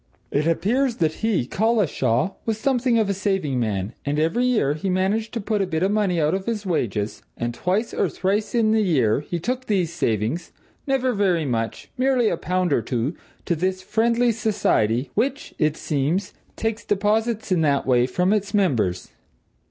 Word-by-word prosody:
It 150 +3 +1
appears 235 +9 +1
that 160 -7 +1
he, 220 - +1
Collishaw, 185 - +1
was 225 -2 -1
something 250 -1 +1
of 220 -2 +2
a 200 - +1
saving 190 -9 -1
man, 105 -2 -2
and 145 +1 -1
every 165 +11 +1
year 215 - +2
he 155 +6 -3
managed 195 +5 0
to - - 0
put 210 0 -1
by 195 - +2
a - - -9
bit 160 -1 -1
of 195 - +2
money 200 -5 +1
out 155 +1 +2
of 190 +2 -3
his 215 -3 -2
wages, 110 - -1 0.2
and 120 0 -2
twice 190 - -1
or - - +1
thrice 205 +5 -1
in 220 -2 +3
the 220 0 +3
year 135 - +2
he 160 +4 -4
took 250 +8 -3
these 180 -6 0
savings 135 - -1 0.4
never 260 -2 +1
very 185 -6 +1
much; 115 -3 -3
merely 255 -3 +3
a 170 - -1
pound 180 -1 0
or 120 - +2
two 120 - -2 0.3
to 170 - +1
this 185 +3 -1
Friendly 235 +3 +2
Society, 140 - +1
which, 270 +6 -1
it 155 -1 +1
seems, 155 +6 -1 0.2
takes 225 0 -2
deposits 215 +2 0
in 180 -3 +3
that 140 -3 +2
way 125 -1 +3
from 180 +9 +1
its 205 0 -1
members. 115 - +1
185 Hz, 185 wpm, -23 LUFS, 145-220 Hz, 0.4 s, in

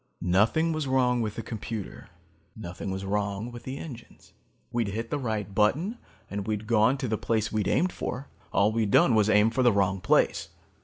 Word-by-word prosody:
Nothing 105 - +3
was 155 -3 -2
wrong 125 -2 +2
with 110 -2 -3
the 115 - -5
computer. 110 -2 -6 0.5
Nothing 95 -2 -6
was 95 +1 -4
wrong 100 +3 -2
with 120 0 -10
the 130 +1 -5
engines. 125 -8 -11 0.4
We'd 120 -3 0
hit 115 +3 -4
the 145 - 0
right 110 -6 -3
button 155 - +1 0.3
and 100 -1 -5
we'd 110 0 -2
gone 115 +4 +3
to 130 -2 -3
the 110 -1 -1
place 110 -2 0
we'd 105 -3 0
aimed 180 +2 +2
for. 135 +3 -5 0.2
All 100 +2 +3
we'd 110 -2 0
done 115 - +5
was 110 -1 +3
aim 105 +1 +5
for 130 +3 0
the 120 -1 +5
wrong 95 -2 +1
place. 90 - +2
110 Hz, 195 wpm, -27 LUFS, 100-125 Hz, 0.5 s, done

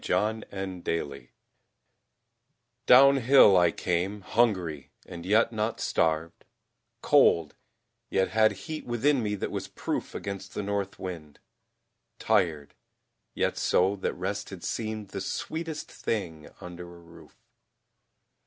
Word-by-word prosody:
THE 110 +1 0 0.4
OWL 70 -4 -2 1.7
DOWNHILL 135 -4 +7
I 90 -1 +5
came, 90 +5 -2
hungry, 95 - 0 0.2
and 85 0 -9
yet 110 +3 +3
not 110 +1 -2
starved; 80 0 -1 0.6
Cold, 85 - +4 0.6
yet 95 0 +1
had 110 0 +3
heat 155 -2 -6
within 125 +3 +1
me 105 -2 -1
that 100 - -4
was - - -4
proof - - -4
Against 95 -1 -6
the - - -2
North 100 -1 -3
wind; 80 -5 -8 0.8
tired, 75 -5 0 0.6
yet - - -1
so 95 +3 +2
that 95 - -3
rest 100 +2 -4
Had 95 -3 -10
seemed 110 -3 -4
the 100 - -5
sweetest 160 - -5
thing 80 -9 -4
under 90 0 -9
a - - -14
roof. 85 0 -17
100 Hz, 115 wpm, -27 LUFS, 85-110 Hz, 1.7 s, DOWNHILL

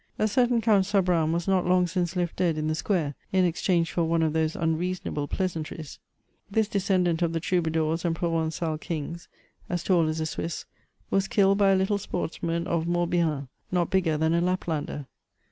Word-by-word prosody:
A 215 - +2
certain 245 +1 +2
Count 205 -4 +4
Sabran 180 -6 +2
was 170 +2 -1
not 190 -2 +2
long 180 0 +4
since 175 0 -2
left 175 -2 -1
dead 170 -4 +1
in 155 0 -1
the 155 - +1
square, 160 -3 0 0.2
in 185 -1 +3
exchange 170 0 +1
for 170 - 0
one 165 0 +1
of 155 -1 +1
those 160 0 0
unreasonable 165 -2 -1
pleasantries. 160 -4 -4 0.5
This 220 +1 +1
descendant 185 -5 +1
of 170 -1 +1
the 165 - 0
troubadours 160 -2 0
and 170 -2 0
provengal 165 -1 -1
kings, 165 +1 -5 0.4
as 175 -1 -2
tall 175 -4 +3
as 155 +1 -2
a 160 - -1
Swiss, 160 +1 -4 0.5
was 195 0 +2
killed 195 -1 +3
by 200 -1 +5
a 195 - +5
little 190 +2 +1
sportsman 170 -2 -3
of 170 -2 -1
Morbihan, 170 -5 0 0.2
not 175 -2 +1
bigger 175 -5 +2
than 160 +1 +2
a 170 - +2
Laplander. 165 -5 -2
170 Hz, 180 wpm, -26 LUFS, 160-185 Hz, 0.5 s, by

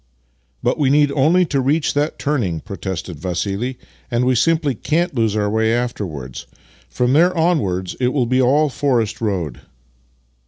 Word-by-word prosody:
" - - -43
But - - 0
we 140 -3 +3
need 145 0 +4
only 160 +6 +3
to 140 -4 0
reach 145 +4 +1
that 145 +2 -1
turning," 120 - -1
pro 100 -1 -8
tested 90 -3 -5
Vassili, 100 - -3 0.2
" - - -32
and 120 0 +1
we 130 - +3
simply 150 +3 +2
can't 160 +9 -1
lose 115 -4 0
our 105 -1 +1
way 110 +1 +1
after 120 -4 -1
wards. 65 -6 -8 0.4
From 125 - 0
there 175 +4 +4
onwards 100 - 0
it 125 -1 +2
v/ill 130 -2 0
be 130 +2 +2
all 145 +4 +3
forest 120 -6 0
road." 90 - -2
125 Hz, 180 wpm, -19 LUFS, 100-145 Hz, 0.4 s, need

